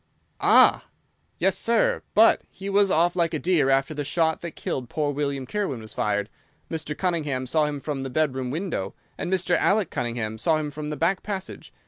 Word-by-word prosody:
"Ah!" -, -, +5 dB, 0.5 s
"Yes, 190 Hz, +1 st, +2 dB
sir. 230 Hz, +3 st, +2 dB
But 225 Hz, +2 st, +6 dB
he 195 Hz, +1 st, -7 dB
was 200 Hz, 0 st, +4 dB
off 175 Hz, +1 st, +2 dB
like 170 Hz, -2 st, +1 dB
a -, -, -1 dB
deer 165 Hz, -6 st, +2 dB
after 135 Hz, +2 st, +2 dB
the 145 Hz, -1 st, -3 dB
shot 160 Hz, +2 st, 0 dB
that 170 Hz, -2 st, -7 dB
killed 125 Hz, -3 st, -4 dB
poor 150 Hz, -2 st, -1 dB
William 140 Hz, -2 st, -2 dB
Kirwan 170 Hz, -, -2 dB
was 110 Hz, -1 st, -10 dB
fired. 105 Hz, -1 st, -1 dB, 0.4 s
Mr. 155 Hz, -2 st, -4 dB
Cunningham 150 Hz, -8 st, -1 dB
saw 155 Hz, +4 st, +2 dB
him 145 Hz, -1 st, -4 dB
from 140 Hz, -1 st, -4 dB
the 135 Hz, -, -4 dB
bedroom 130 Hz, -2 st, -1 dB
window, 150 Hz, -, -3 dB, 0.2 s
and 175 Hz, -, -4 dB
Mr. 185 Hz, -1 st, +1 dB
Alec 200 Hz, -3 st, +2 dB
Cunningham 115 Hz, -2 st, -3 dB
saw 155 Hz, +7 st, +2 dB
him 150 Hz, -1 st, -3 dB
from 150 Hz, +1 st, -6 dB
the 150 Hz, -, -4 dB
back 175 Hz, +6 st, +1 dB
passage. 195 Hz, -3 st, -6 dB
155 Hz, 190 wpm, -25 LUFS, 135-180 Hz, 0.5 s, But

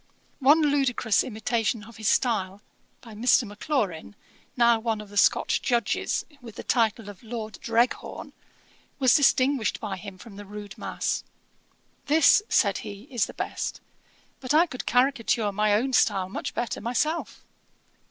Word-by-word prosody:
One 295 Hz, +4 st, +5 dB
ludicrous 270 Hz, -7 st, +2 dB
imitation 225 Hz, -1 st, -2 dB
of 230 Hz, 0 st, -14 dB
his 215 Hz, -2 st, -3 dB
style, 205 Hz, -6 st, 0 dB, 0.4 s
by 230 Hz, -3 st, -12 dB
Mr. 245 Hz, +4 st, +3 dB
Maclaurin, 205 Hz, -, -3 dB, 0.4 s
now 235 Hz, -1 st, +4 dB
one 225 Hz, -1 st, -2 dB
of 210 Hz, -1 st, -10 dB
the 205 Hz, -, -13 dB
Scotch 200 Hz, -, +3 dB
Judges, 235 Hz, -4 st, 0 dB, 0.2 s
with 230 Hz, -4 st, -11 dB
the -, -, -7 dB
title 225 Hz, -3 st, 0 dB
of 205 Hz, -2 st, -10 dB
Lord 220 Hz, -3 st, -7 dB
Dreghorn, 235 Hz, +2 st, -1 dB, 0.6 s
was 260 Hz, -3 st, +4 dB
distinguished 270 Hz, -4 st, +2 dB
by 200 Hz, -3 st, -5 dB
him 190 Hz, 0 st, -9 dB
from 200 Hz, 0 st, -13 dB
the 205 Hz, -, -9 dB
rude 205 Hz, -1 st, -9 dB
mass. -, -, -3 dB, 0.8 s
'This 315 Hz, +6 st, +5 dB
(said -, -, +2 dB
he,) 200 Hz, 0 st, -9 dB
is 240 Hz, -5 st, 0 dB
the -, -, -11 dB
best. -, -, -4 dB, 0.6 s
But 265 Hz, +2 st, -1 dB
I 330 Hz, +3 st, +6 dB
could 260 Hz, -7 st, -8 dB
caricature 245 Hz, -4 st, +2 dB
my 210 Hz, +1 st, +2 dB
own 260 Hz, +5 st, 0 dB
style 190 Hz, -5 st, +2 dB
much -, -, -5 dB
better 240 Hz, -, -3 dB
myself.' 305 Hz, +8 st, -2 dB
230 Hz, 150 wpm, -26 LUFS, 205-255 Hz, 0.8 s, I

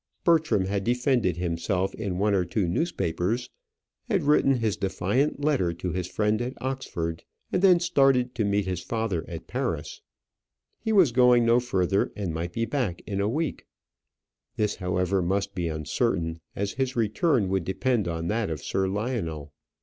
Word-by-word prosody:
Bertram 160 Hz, -, +3 dB
had 100 Hz, +1 st, -1 dB
defended 120 Hz, -, +1 dB
himself 90 Hz, +2 st, -1 dB
in 100 Hz, -5 st, -3 dB
one 105 Hz, +2 st, +2 dB
or 95 Hz, -2 st, +3 dB
two 90 Hz, +2 st, -1 dB
newspapers, 95 Hz, -, -1 dB, 0.6 s
had 195 Hz, -7 st, +1 dB
written 145 Hz, -2 st, +4 dB
his 110 Hz, -4 st, 0 dB
defiant 105 Hz, +9 st, 0 dB
letter 125 Hz, -, +2 dB
to 90 Hz, +1 st, -4 dB
his 90 Hz, +1 st, -2 dB
friend 105 Hz, +3 st, 0 dB
at 125 Hz, +2 st, -4 dB
Oxford, 85 Hz, -11 st, -3 dB, 0.3 s
and 180 Hz, -, +1 dB
then 185 Hz, -3 st, +6 dB
started 135 Hz, -7 st, +3 dB
to 120 Hz, -, -1 dB
meet 100 Hz, -1 st, +1 dB
his 90 Hz, -2 st, -3 dB
father 110 Hz, -8 st, -2 dB
at -, -, -7 dB
Paris. -, -, -3 dB, 0.8 s
He 220 Hz, -, -2 dB
was 185 Hz, -, +5 dB
going 125 Hz, -1 st, +5 dB
no 115 Hz, +1 st, +5 dB
further, 95 Hz, -5 st, 0 dB
and 95 Hz, -6 st, -3 dB
might 85 Hz, +2 st, -3 dB
be 115 Hz, -, 0 dB
back 115 Hz, -8 st, -2 dB
in 100 Hz, -2 st, -2 dB
a 100 Hz, -, +1 dB
week. 155 Hz, +4 st, -2 dB, 0.9 s
This 105 Hz, -1 st, 0 dB
however 90 Hz, +1 st, 0 dB
must 100 Hz, +3 st, -1 dB
be 90 Hz, -4 st, -2 dB
uncertain, 80 Hz, +2 st, -1 dB, 0.2 s
as 100 Hz, +1 st, -2 dB
his 130 Hz, -1 st, -2 dB
return 115 Hz, -, +2 dB
would 95 Hz, -1 st, 0 dB
depend 105 Hz, +3 st, 0 dB
on 85 Hz, -1 st, -3 dB
that 110 Hz, +2 st, 0 dB
of 80 Hz, -3 st, -4 dB
Sir 95 Hz, 0 st, 0 dB
Lionel. 95 Hz, -, -3 dB
100 Hz, 165 wpm, -26 LUFS, 90-125 Hz, 0.9 s, then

